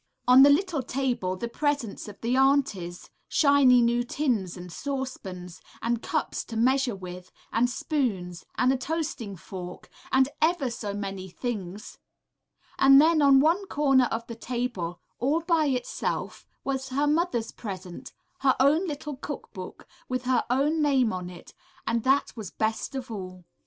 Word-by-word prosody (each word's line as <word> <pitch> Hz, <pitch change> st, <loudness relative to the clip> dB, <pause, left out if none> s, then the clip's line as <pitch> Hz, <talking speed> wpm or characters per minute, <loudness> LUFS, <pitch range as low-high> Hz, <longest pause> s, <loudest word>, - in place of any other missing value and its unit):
On 250 Hz, +1 st, +8 dB
the 280 Hz, -, +9 dB
little 320 Hz, 0 st, +2 dB
table 250 Hz, -8 st, -1 dB
the 235 Hz, +5 st, -4 dB
presents 285 Hz, -5 st, -2 dB
of 205 Hz, -, -10 dB
the 235 Hz, +2 st, 0 dB
aunties, 265 Hz, -11 st, +1 dB, 0.2 s
shiny 280 Hz, -4 st, +5 dB
new 240 Hz, +1 st, +2 dB
tins 240 Hz, -, -1 dB
and 180 Hz, 0 st, -9 dB
saucepans, 190 Hz, -10 st, -5 dB, 0.2 s
and 235 Hz, 0 st, -1 dB
cups -, -, -2 dB
to 225 Hz, -, -6 dB
measure 255 Hz, 0 st, +2 dB
with, 180 Hz, -1 st, -9 dB, 0.2 s
and 240 Hz, +2 st, +2 dB
spoons, 205 Hz, -, -2 dB
and 255 Hz, +1 st, +3 dB
a -, -, 0 dB
toasting 270 Hz, -8 st, -3 dB
fork, 180 Hz, 0 st, -9 dB, 0.2 s
and 265 Hz, 0 st, +4 dB
ever 315 Hz, -6 st, +2 dB
so 205 Hz, -3 st, -4 dB
many 195 Hz, -2 st, -5 dB
things; 205 Hz, -2 st, -6 dB, 0.8 s
and 275 Hz, 0 st, +8 dB
then 315 Hz, +1 st, +5 dB
on 275 Hz, -2 st, +6 dB
one 345 Hz, +6 st, +2 dB
corner 270 Hz, -5 st, +3 dB
of 230 Hz, -1 st, -3 dB
the 230 Hz, -, -7 dB
table, 230 Hz, -8 st, -3 dB, 0.2 s
all 290 Hz, +7 st, +1 dB
by 330 Hz, -2 st, +2 dB
itself, 250 Hz, -3 st, -3 dB, 0.2 s
was 270 Hz, -1 st, -2 dB
her 280 Hz, +3 st, +1 dB
mother's 295 Hz, -7 st, 0 dB
present, 185 Hz, -5 st, -8 dB, 0.3 s
her 270 Hz, -2 st, +3 dB
own 300 Hz, +8 st, +4 dB
little 295 Hz, -2 st, -5 dB
cook 290 Hz, +1 st, -7 dB
book, 185 Hz, -3 st, -9 dB, 0.2 s
with 255 Hz, 0 st, -2 dB
her 255 Hz, -1 st, +2 dB
own 290 Hz, +5 st, +2 dB
name 265 Hz, -7 st, +3 dB
on 180 Hz, -1 st, -4 dB
it, 175 Hz, -1 st, -12 dB, 0.3 s
and 230 Hz, +1 st, 0 dB
that 270 Hz, +2 st, +2 dB
was 215 Hz, -6 st, -6 dB
best 220 Hz, +5 st, -2 dB
of 260 Hz, -3 st, -5 dB
all. 185 Hz, -4 st, -7 dB
250 Hz, 155 wpm, -27 LUFS, 200-280 Hz, 0.8 s, the